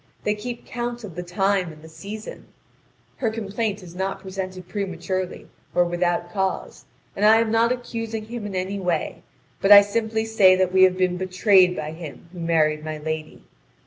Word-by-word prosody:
They 210 - +1
keep 235 +3 -7
count 240 -1 -4
of 200 -5 -8
the 175 - -5
time 185 0 0
and 155 0 -15
the - - -11
season. 200 +7 -9 0.7
Her 235 - 0
complaint 210 -1 -3
is 170 -2 -11
not 190 +2 -3
presented 185 -1 -6
prematurely 185 -2 -4 0.3
or 175 - +4
without 175 0 -1
cause, 190 0 -3 0.3
and 200 - -2
I 215 +1 +7
am 225 -1 +1
not 230 +1 +3
accusing 230 -3 -4
him 225 -2 -6
in 195 - -6
any 190 +2 -2
way, 180 -3 -2 0.4
but 195 - +3
I 200 0 +12
simply 220 +2 -1
say 205 -4 +5
that 185 -1 +1
we 190 - +5
have 185 0 +1
been 180 -1 +1
betrayed 185 0 +4
by 155 -2 -4
him 160 0 -10
who 180 - -9
married 155 -2 +1
my 155 0 -4
lady. 155 - -5
190 Hz, 180 wpm, -23 LUFS, 175-215 Hz, 0.7 s, I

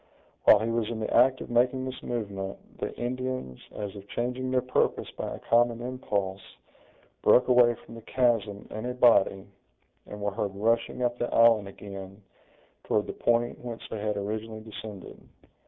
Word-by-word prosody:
While 105 - +8
he 115 +1 -1
was 115 -2 0
in 115 -2 -4
the 110 - -2
act 130 +1 +5
of - - -7
making 125 +2 +2
this 130 -1 -6
movement, 100 -5 -4 0.2
the - - -2
Indians, 125 - -4
as 105 -1 -6
if 100 0 -10
changing 125 +4 -2
their 130 -1 +1
purpose 125 - 0
by - - -5
a - - -9
common 120 0 +2
impulse, 105 -6 -3 0.8
broke 125 - +5
away 120 -2 +5
from 115 - -15
the 115 - -9
chasm 110 -4 0
in 110 +3 -4
a 125 - -3
body, 100 -6 +4 0.6
and 105 - -8
were 100 0 -1
heard 100 -1 -3
rushing 115 +4 0
up 120 0 0
the 120 - -1
island 115 -3 +5
again, 100 0 -9 0.6
toward 105 - +1
the - - -5
point 120 +1 0
whence 120 -2 -7
they 110 - -3
had 105 0 -1
originally 110 +2 -4
descended. 110 -3 -9
115 Hz, 170 wpm, -28 LUFS, 100-120 Hz, 0.8 s, While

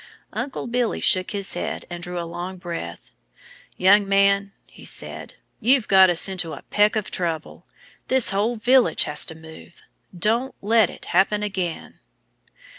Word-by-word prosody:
Uncle 275 - -4
Billy 240 -1 -1
shook 185 -1 +2
his 200 -2 0
head - - -4
and 175 -1 -8
drew 180 0 -5
a 170 - -4
long 175 +3 -6
breath. 170 - -7 0.7
"Young 195 +2 +4
man," 200 0 +3
he - - -17
said, - - -7 0.2
"you've 250 0 +3
got 190 -1 +6
us 175 +1 +4
into 180 -4 -4
a - - -10
peck 210 +2 +3
of 215 -2 -3
trouble. 165 -3 -4 0.4
This 260 -3 +3
whole 210 +5 0
village 245 +3 +3
has 150 - 0
to 160 - -6
move. 160 +1 -14 0.3
Don't 230 +8 0
let 220 -1 +3
it - - -11
happen 205 +3 +2
again!" 185 -5 -4
195 Hz, 155 wpm, -22 LUFS, 175-215 Hz, 0.7 s, got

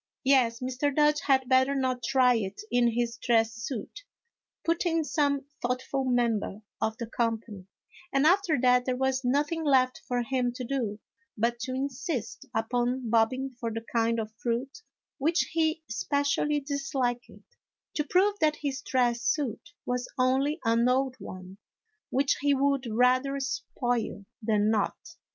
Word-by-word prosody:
"Yes, 255 -4 +3
Mr. 255 +3 -1
Dodge 300 0 +4
had 265 -3 +2
better 260 +1 +3
not 255 -2 0
try 250 +1 +4
it 205 - -3
in 245 -1 +4
his 235 +1 -1
dress 225 -2 +2
suit," 230 - -6 0.6
put 335 0 +1
in 330 -2 +1
some 285 -2 0 0.2
thoughtful 255 +2 -1
member 235 -4 0 0.2
of 220 0 -1
the 235 - -4
company; 225 -4 -3 0.4
and 275 +2 +2
after 355 -3 +3
that, 250 -1 +4
there 255 - 0
was 265 0 0
nothing 290 +6 0
left 260 -3 +3
for 245 -1 0
him 250 -1 -1
to 250 - -6
do 235 -5 -2 0.4
but 235 +2 0
to 255 +2 -3
insist 270 - -4
upon 240 +1 -1
bobbing 255 +4 +2
for 230 -1 -2
the 225 +1 -5
kind 230 0 +2
of 220 0 -5
fruit 255 - -2 0.4
which 320 +5 +2
he 320 0 0
specially 285 +1 0
disliked, 275 -4 -2 0.6
to 300 - 0
prove 375 +7 +3
that 305 -1 +3
his 280 -2 -3
dress 245 -4 +1
suit 290 +3 -1 0.2
was 250 0 -2
only 265 +5 +2
an 230 +2 +3
old 260 0 +1
one, 185 0 -9 0.5
which 270 +1 +1
he 285 -1 +3
would 275 -1 +1
rather 255 +4 +2
spoil 245 -6 -2 0.2
than 215 -1 +2
not. 210 -2 0
255 Hz, 150 wpm, -28 LUFS, 235-280 Hz, 0.6 s, Dodge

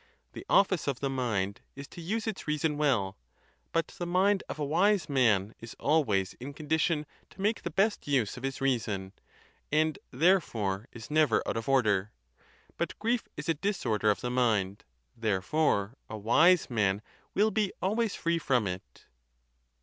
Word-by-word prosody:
The - - -9
office 190 -6 +3
of 135 -3 -1
the 135 -1 -1
mind 105 -7 -1
is 140 0 -8
to 175 - -10
use 210 +6 -2
its 220 -7 -4
reason 150 0 0
well; 125 - 0 0.5
but 165 -1 0
the 175 - -6
mind 190 +3 +3
of - - -5
a 150 - -2
wise 180 +3 +2
man 115 - +2
is 115 0 -10
always 110 -12 +2
in 135 +3 -7
condition 155 0 0 0.2
to - - -21
make 210 +3 0
the - - -3
best 195 +4 0
use 130 -8 +1
of 125 - -9
his 135 0 -4
reason, 105 -8 -1 0.6
and 155 0 +2
there 180 +8 +4
fore 105 -5 -3
is 120 +3 -10
never 150 -6 +3
out - - -1
of 115 +3 -3
order. 105 -6 +2 0.7
But - - -3
grief 230 +2 0
is - - -5
a 165 - +3
disorder 140 - 0
of 105 - +1
the 125 - -2
mind; 105 -6 +1 0.3
therefore 105 +1 0 0.2
a 110 - -5
wise 160 - +4
man 105 -3 0 0.3
will 215 +2 +3
be 210 -3 0
always 215 +3 0
free 170 0 0
from 125 -8 +1
it. 90 -10 -7
140 Hz, 170 wpm, -29 LUFS, 110-170 Hz, 0.7 s, there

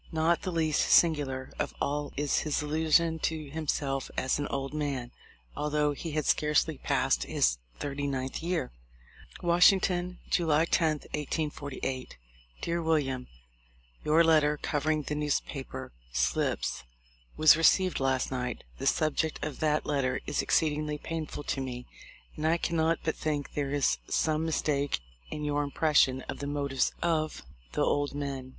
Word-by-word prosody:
Not 165 +1 +2
the 185 - -3
least 160 -3 +1
singular 140 -6 +3
of - - -2
all 145 +1 -1
is 145 0 +1
his 150 -1 -1
illusion 160 +2 +2
to 155 -3 -2
himself 140 -3 -2
as 130 +2 +1
an 145 - -1
old 135 0 -3
man, 140 -5 -2 0.4
although 150 0 +1
he 160 +2 -6
had 155 -2 -1
scarcely 150 -1 +2
passed - - +1
his - - +1 0.2
thirty 145 0 -3
ninth 130 -1 -3
year. 170 - -1 0.7
"Washington, 180 0 +4
July 160 -2 +3
10, 160 -3 +1
1848. 145 - -3 0.4
"Dear 170 0 -1
William: 140 -6 0 0.8
"Your 155 +2 +5
letter 155 -2 +4
covering 150 +1 0
the 150 - -3
newspaper 150 -2 -3 0.2
slips - - 0 0.5
was 155 0 +8
received 185 +3 +3
last 130 -1 0
night. 125 -3 -3 0.2
The - - -1
subject 155 0 +1
of 150 -3 -6
that 155 -1 +1
letter 135 -3 0
is - - 0
exceedingly 150 -1 +1
painful 155 -1 -5
to 135 - -2
me, 125 -1 -5 0.5
and 155 - -1
I 165 +2 +3
can 170 0 -2
not 160 0 +2
but 160 - -1
think 150 -2 -3
there 145 -2 -1
is 140 - +1
some 155 0 +1
mistake 145 - 0 0.3
in 150 - -5
your 145 0 +1
im 145 - -4
pression 140 -4 +3
of - - -6
the 140 - -4
motives 140 -2 0
of 155 -2 0 0.3
the - - +1
old 145 -1 0
men. 135 -3 -4
150 Hz, 150 wpm, -29 LUFS, 140-160 Hz, 0.8 s, was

